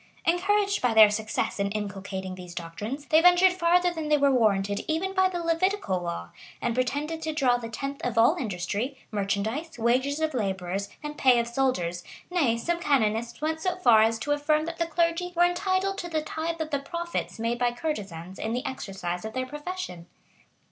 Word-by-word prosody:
[*] -, -, -28 dB
Encouraged 400 Hz, +4 st, +2 dB
by 245 Hz, -3 st, +1 dB
their 215 Hz, -1 st, +9 dB
success 215 Hz, -1 st, -2 dB
in 200 Hz, 0 st, +1 dB
inculcating 195 Hz, -2 st, -4 dB
these 180 Hz, -1 st, -10 dB
doctrines, 210 Hz, -, -5 dB
they 315 Hz, +2 st, +4 dB
ventured 360 Hz, +1 st, +6 dB
farther 355 Hz, 0 st, +3 dB
than 320 Hz, -2 st, -4 dB
they 300 Hz, -, +5 dB
were 280 Hz, -1 st, +4 dB
warranted 205 Hz, -5 st, +2 dB
even 340 Hz, +5 st, -1 dB
by 375 Hz, -1 st, +3 dB
the 360 Hz, -, -4 dB
Levitical 335 Hz, -, 0 dB
law, 85 Hz, -, -5 dB, 0.3 s
and 240 Hz, -, -1 dB
pretended 290 Hz, +6 st, -1 dB
to 315 Hz, -, -2 dB
draw 270 Hz, -6 st, +2 dB
the 230 Hz, -1 st, -7 dB
tenth 275 Hz, +5 st, -5 dB
of 240 Hz, -2 st, -2 dB
all 230 Hz, +1 st, +5 dB
industry, 210 Hz, +4 st, -3 dB
merchandise, 220 Hz, +10 st, -2 dB
wages 255 Hz, +5 st, +1 dB
of 315 Hz, -1 st, 0 dB
laborers, 195 Hz, -3 st, -2 dB
and 295 Hz, 0 st, -6 dB
pay 255 Hz, -2 st, +5 dB
of 235 Hz, -, -1 dB
soldiers;[] 235 Hz, -9 st, -1 dB, 0.3 s
nay, 280 Hz, -11 st, +2 dB
some 340 Hz, +8 st, -1 dB
canonists 235 Hz, -5 st, 0 dB
went 320 Hz, +1 st, -1 dB
so 365 Hz, +1 st, 0 dB
far 240 Hz, -12 st, +5 dB
as 225 Hz, +1 st, +3 dB
to 290 Hz, +6 st, -3 dB
affirm 305 Hz, +1 st, +2 dB
that 335 Hz, 0 st, -6 dB
the 335 Hz, -, +1 dB
clergy 335 Hz, +2 st, 0 dB
were 350 Hz, +1 st, +5 dB
entitled 375 Hz, +2 st, 0 dB
to 345 Hz, -, -5 dB
the 315 Hz, -2 st, -1 dB
tithe 325 Hz, +2 st, -3 dB
of 315 Hz, -1 st, -3 dB
the 285 Hz, -, +1 dB
profits 340 Hz, +2 st, -4 dB
made 230 Hz, +1 st, -1 dB
by 245 Hz, -1 st, +2 dB
courtesans 195 Hz, -, -5 dB
in 220 Hz, -, -2 dB
the 250 Hz, +4 st, -2 dB
exercise 190 Hz, -8 st, -4 dB
of 220 Hz, 0 st, -6 dB
their 255 Hz, 0 st, -2 dB
profession. 295 Hz, -, -6 dB
265 Hz, 195 wpm, -27 LUFS, 210-330 Hz, 0.3 s, their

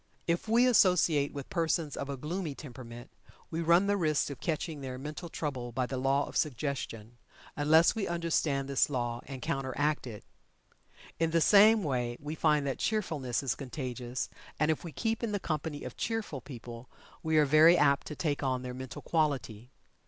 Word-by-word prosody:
If 170 Hz, +5 st, -1 dB
we 235 Hz, +3 st, +4 dB
associate 180 Hz, -, +4 dB
with 140 Hz, -2 st, -8 dB
persons 165 Hz, -3 st, 0 dB
of 140 Hz, -, -5 dB
a 140 Hz, -, -3 dB
gloomy 155 Hz, +2 st, -4 dB
temperament, 120 Hz, -4 st, -10 dB, 0.4 s
we 165 Hz, +1 st, -2 dB
run 170 Hz, +3 st, +4 dB
the 205 Hz, 0 st, +2 dB
risk 155 Hz, -5 st, +1 dB
of 135 Hz, -, -8 dB
"catching" 160 Hz, -2 st, -3 dB
their 130 Hz, -1 st, -5 dB
mental 150 Hz, +5 st, -7 dB
trouble 130 Hz, -7 st, -4 dB
by 125 Hz, +2 st, -1 dB
the 130 Hz, 0 st, -4 dB
law 135 Hz, +2 st, +2 dB
of -, -, -10 dB
suggestion, 120 Hz, -5 st, -3 dB, 0.4 s
unless 160 Hz, +3 st, +5 dB
we 220 Hz, -3 st, -2 dB
understand 160 Hz, -5 st, 0 dB
this 140 Hz, +1 st, +2 dB
law 120 Hz, -3 st, -2 dB
and 135 Hz, -2 st, -7 dB
counteract 145 Hz, -1 st, -1 dB
it. 110 Hz, -3 st, -8 dB, 1.0 s
In 165 Hz, -1 st, +2 dB
the 165 Hz, +1 st, +2 dB
same 210 Hz, +5 st, +6 dB
way 125 Hz, -5 st, -1 dB
we 150 Hz, +1 st, -5 dB
find 150 Hz, -2 st, +2 dB
that 135 Hz, -, -2 dB
cheerfulness 155 Hz, -, -1 dB
is 130 Hz, -4 st, 0 dB
contagious, 125 Hz, -2 st, -5 dB, 0.3 s
and 155 Hz, +1 st, +3 dB
if 155 Hz, -, -3 dB
we 170 Hz, -, -6 dB
keep 225 Hz, +6 st, -2 dB
in 230 Hz, -3 st, -2 dB
the 205 Hz, -, 0 dB
company 155 Hz, -3 st, -3 dB
of -, -, -7 dB
cheerful 220 Hz, -, -3 dB
people 120 Hz, -2 st, -10 dB, 0.3 s
we 160 Hz, 0 st, +1 dB
are 150 Hz, -, +6 dB
very 155 Hz, +4 st, +7 dB
apt 140 Hz, -3 st, +3 dB
to 150 Hz, -, -6 dB
take 145 Hz, -3 st, -1 dB
on 130 Hz, -2 st, -1 dB
their 125 Hz, 0 st, -5 dB
mental 130 Hz, 0 st, -8 dB
quality. 135 Hz, -8 st, -1 dB
145 Hz, 180 wpm, -30 LUFS, 130-165 Hz, 1.0 s, very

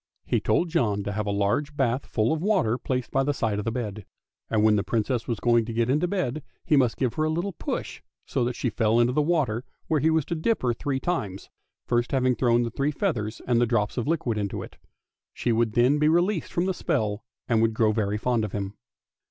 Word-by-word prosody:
He -, -, +1 dB
told 175 Hz, -, +1 dB
John 105 Hz, -, +1 dB
to 105 Hz, -, -3 dB
have 105 Hz, 0 st, -3 dB
a -, -, 0 dB
large 105 Hz, +9 st, 0 dB
bath 130 Hz, +1 st, 0 dB
full 110 Hz, +5 st, +1 dB
of 160 Hz, -, -2 dB
water 180 Hz, -, +1 dB
placed 125 Hz, -2 st, -3 dB
by 135 Hz, -, +2 dB
the 145 Hz, +1 st, 0 dB
side 110 Hz, -4 st, -1 dB
of 105 Hz, -, -4 dB
the 115 Hz, -, 0 dB
bed, 110 Hz, -3 st, -4 dB, 0.5 s
and 110 Hz, -2 st, +2 dB
when 110 Hz, -1 st, +5 dB
the 100 Hz, -, +2 dB
Princess 115 Hz, +1 st, -1 dB
was 115 Hz, -3 st, -2 dB
going 120 Hz, -1 st, +3 dB
to 115 Hz, -, -5 dB
get 115 Hz, +2 st, +1 dB
into 155 Hz, +6 st, +2 dB
bed 165 Hz, -7 st, -2 dB, 0.2 s
he 150 Hz, -, +3 dB
must 125 Hz, -5 st, +3 dB
give 125 Hz, -4 st, 0 dB
her 155 Hz, -, -1 dB
a 155 Hz, -, +1 dB
little 175 Hz, +5 st, -2 dB
push -, -, -4 dB, 0.2 s
so -, -, -1 dB
that 125 Hz, 0 st, -2 dB
she 125 Hz, -, -1 dB
fell 115 Hz, 0 st, +2 dB
into 120 Hz, +1 st, +3 dB
the 150 Hz, -, +2 dB
water, 145 Hz, -8 st, 0 dB, 0.2 s
where 155 Hz, -, +1 dB
he 155 Hz, -, +3 dB
was 160 Hz, -3 st, +2 dB
to -, -, -3 dB
dip 215 Hz, +5 st, 0 dB
her 120 Hz, -1 st, +2 dB
three 135 Hz, +3 st, -2 dB
times, 120 Hz, -, -3 dB, 0.3 s
first 120 Hz, +2 st, 0 dB
having 130 Hz, -1 st, +3 dB
thrown 120 Hz, -1 st, +2 dB
the 115 Hz, -, -3 dB
three 140 Hz, +4 st, 0 dB
feathers 130 Hz, -, -2 dB
and 120 Hz, -1 st, +2 dB
the 120 Hz, -, +3 dB
drops 105 Hz, -3 st, 0 dB
of 120 Hz, +1 st, -2 dB
liquid 130 Hz, -9 st, 0 dB
into 100 Hz, -1 st, -3 dB
it. -, -, -12 dB, 0.6 s
She 120 Hz, -, 0 dB
would 115 Hz, -1 st, +1 dB
then 125 Hz, +6 st, +3 dB
be 150 Hz, +1 st, +4 dB
released 175 Hz, +1 st, +1 dB
from 175 Hz, -, 0 dB
the 190 Hz, -, 0 dB
spell 105 Hz, -, -1 dB, 0.2 s
and 115 Hz, -2 st, +2 dB
would 115 Hz, -1 st, +2 dB
grow 110 Hz, -1 st, +3 dB
very 105 Hz, -1 st, 0 dB
fond 120 Hz, 0 st, 0 dB
of 105 Hz, -, -4 dB
him. 100 Hz, -1 st, -3 dB
120 Hz, 240 wpm, -26 LUFS, 110-150 Hz, 0.6 s, when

